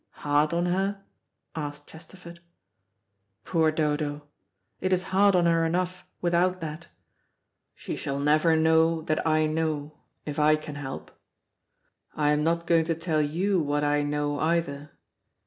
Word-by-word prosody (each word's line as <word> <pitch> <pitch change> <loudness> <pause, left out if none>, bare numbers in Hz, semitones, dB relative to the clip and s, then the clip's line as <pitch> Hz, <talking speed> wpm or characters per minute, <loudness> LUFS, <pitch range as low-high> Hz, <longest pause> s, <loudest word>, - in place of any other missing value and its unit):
"Hard 145 +1 +2
on 170 +1 0
her?" 195 +2 -1 0.5
asked 145 -2 -6
Chesterford. 170 +1 -13 1.1
"Poor 160 -3 +2
Dodo, 150 -1 -1 0.6
it 185 - -1
is 185 0 +2
hard 200 0 +5
on 175 -1 +3
her 165 -1 +3
enough 180 +2 -2
without 180 +1 +1
that. 160 0 -7 0.9
She - - -6
shall 140 0 -4
never 155 +3 +3
know 160 0 +3
that 155 -1 -1
I 155 0 +3
know, 155 -1 -2 0.3
if 150 0 -4
I 150 +1 +5
can 155 -1 -7
help. 145 -2 -7 1.0
I 150 -1 +2
am 150 0 +1
not 170 +1 0
going 165 -1 +3
to 165 0 -1
tell 165 -2 0
you 175 +5 0
what 145 0 -1
I 145 0 +2
know 145 0 -1
either. 155 -3 -1
160 Hz, 145 wpm, -26 LUFS, 150-170 Hz, 1.1 s, hard